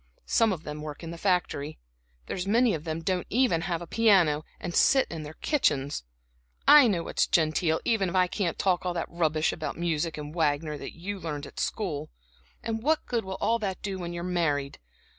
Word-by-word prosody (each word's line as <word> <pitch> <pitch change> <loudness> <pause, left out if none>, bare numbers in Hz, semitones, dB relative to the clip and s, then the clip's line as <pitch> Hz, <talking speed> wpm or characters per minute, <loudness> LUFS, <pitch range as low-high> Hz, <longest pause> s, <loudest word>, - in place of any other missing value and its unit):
Some 225 -2 +3
of 170 -4 -4
them 150 0 -6
work 150 +1 -7
in 165 - -6
the 170 - -7
factory, 175 -6 0 0.5
there's 185 0 -4
many 230 +2 +4
of 155 0 -4
them 160 0 -3
don't 185 -1 -1
even 235 -8 +2
have 170 0 -2
a - - -7
piano 175 -8 +3 0.2
and 175 - -5
sit 270 +7 +4
in 165 -2 -5
their 155 +1 -8
kitchens. 145 - 0 0.6
I 295 -4 +9
know 180 -6 0
what's - - 0
genteel, 160 -1 +2
even 200 -5 +2
if 180 - -5
I 185 -1 +5
can't 180 -1 -2
talk 185 -2 +1
all 180 -1 -2
that 170 - -3
rubbish 160 -2 +1
about - - -5
music 165 -1 -1
and 150 0 -7
Wagner 150 -2 0
that 145 - -8
you 195 +4 -5
learned 150 -4 -5
at - - -10
school. 155 -8 -2 0.5
And 225 0 -2
what 310 +5 +1
good 235 -2 -1
will 190 0 -5
all 230 +1 +1
that 195 -4 -4
do 200 - -2
you 190 - -4
when 175 -1 -4
you're 170 0 -5
married? 155 -6 -1
175 Hz, 210 wpm, -27 LUFS, 155-195 Hz, 0.6 s, I